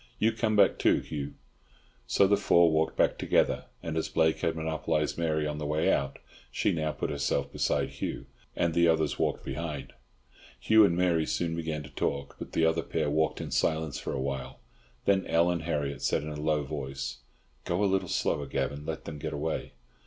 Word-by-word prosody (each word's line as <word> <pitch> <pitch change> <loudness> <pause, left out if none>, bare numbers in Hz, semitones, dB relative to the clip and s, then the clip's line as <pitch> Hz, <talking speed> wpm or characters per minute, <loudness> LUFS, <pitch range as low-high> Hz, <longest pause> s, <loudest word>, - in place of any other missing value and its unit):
You 110 - +3
come 110 -1 0
back 100 -2 +4
too, - - +4
Hugh." 75 -2 -5 0.7
So 100 - +4
the 100 +1 +4
four 85 -4 +4
walked 80 +1 +1
back - - +2
together, - - +2 0.2
and 80 -1 -3
as 80 - -1
Blake 80 0 +2
had 80 - 0
monopolised 80 -1 -1
Mary 80 -2 0
on 75 0 -3
the 75 - -3
way 75 +1 +2
out, 70 0 -1 0.3
she - - +1
now 80 -1 -1
put - - -3
herself 70 0 -1
beside - - 0
Hugh, - - -5 0.3
and 85 -1 +1
the 85 +1 +4
others 80 -2 +1
walked - - 0
behind. 75 -4 -5 0.7
Hugh 110 0 +6
and 85 -3 +1
Mary 85 -3 +2
soon 85 -1 -1
began 80 -2 -3
to 75 - -12
talk, 70 -1 -2
but - - -8
the 80 - +3
other 80 +1 +2
pair 75 -1 -1
walked 80 +1 +1
in - - -6
silence 80 -2 0
for - - -4
a - - -2
while. 65 -1 -4 0.5
Then 95 -1 +3
Ellen 85 +1 +3
Harriott 75 -3 -2
said - - +1
in 75 - -5
a 75 - -5
low 75 -1 +1
voice, 70 -1 -5 0.4
"Go 90 +4 0
a - - +4
little 95 -1 +1
slower, - - 0
Gavan. 70 +1 -3
Let 80 -1 -4
them 75 - -6
get 80 0 -4
away." 75 +2 -3
80 Hz, 195 wpm, -29 LUFS, 75-85 Hz, 0.7 s, Hugh